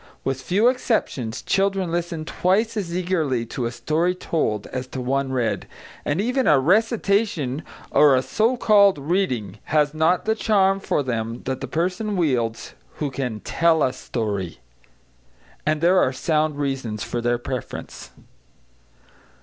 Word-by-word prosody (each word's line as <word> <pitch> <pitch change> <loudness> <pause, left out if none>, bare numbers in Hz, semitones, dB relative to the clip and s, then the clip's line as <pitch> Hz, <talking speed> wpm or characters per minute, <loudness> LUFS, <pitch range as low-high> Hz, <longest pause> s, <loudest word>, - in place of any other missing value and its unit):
With 135 -1 -2
few 200 - +2
exceptions, 220 - -1
children 195 -2 +1
listen 170 -2 -2
twice 210 +7 +1
as 180 -5 -2
eagerly 160 -10 0
to 120 +1 -3
a - - -4
story 155 +9 0
told 110 - -1
as 130 0 -5
to 130 - -6
one 135 +2 -1
read, 115 -6 -1 0.4
and 145 +4 -1
even 250 +4 +1
a 150 - +6
"recitation" 200 - +1 0.3
or 145 -3 +6
a 130 - +1
so 230 - +1
called 200 -5 +5
"reading" 135 - -1
has 150 -1 +2
not 160 +3 +2
the 220 - +2
charm 195 -3 +2
for 150 - 0
them 115 -2 -3
that 130 0 -3
the - - -4
person 190 +5 -1
wields 125 -9 -1 0.2
who 145 -3 -3
can 125 -5 -4
"tell 165 -1 +2
a 130 - +1
story." 100 - -3 1.1
And 155 0 +1
there 180 +2 +5
are 130 - +3
sound 155 +2 0
reasons 135 -7 -2
for 120 - -3
their 120 0 +1
preference. 125 +1 -6
155 Hz, 150 wpm, -23 LUFS, 125-190 Hz, 1.1 s, a